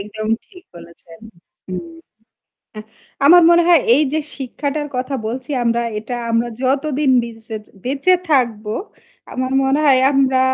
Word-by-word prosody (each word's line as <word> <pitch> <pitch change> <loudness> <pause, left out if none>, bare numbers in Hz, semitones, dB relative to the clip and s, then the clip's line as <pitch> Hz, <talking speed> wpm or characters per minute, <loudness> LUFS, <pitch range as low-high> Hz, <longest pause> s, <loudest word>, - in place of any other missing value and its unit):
একদম 215 +2 -6 0.2
ঠিক 360 -3 -16
বলেছেন। 170 -1 -14 0.5
হুম, 330 - -7 1.3
আমার 350 +3 +8
মনে 345 0 +5
হয় 340 -4 +6
এই 300 - +3
যে 315 - 0 0.2
শিক্ষাটার 285 +3 -4
কথা 260 +2 -3
বলছি 255 +4 -5
আমরা 235 0 +1 0.2
এটা 225 +3 -6 0.2
আমরা 230 +1 +1
যতদিন 275 +1 0
বিচে 225 -1 -8 0.3
বেঁচে 275 +8 +2 0.2
থাকবো, 225 -6 +1 0.6
আমার 255 0 -3
মনে 270 +2 +1
হয় 265 -2 +5
আমরা 265 -1 +2
260 Hz, 130 wpm, -18 LUFS, 230-290 Hz, 1.3 s, আমার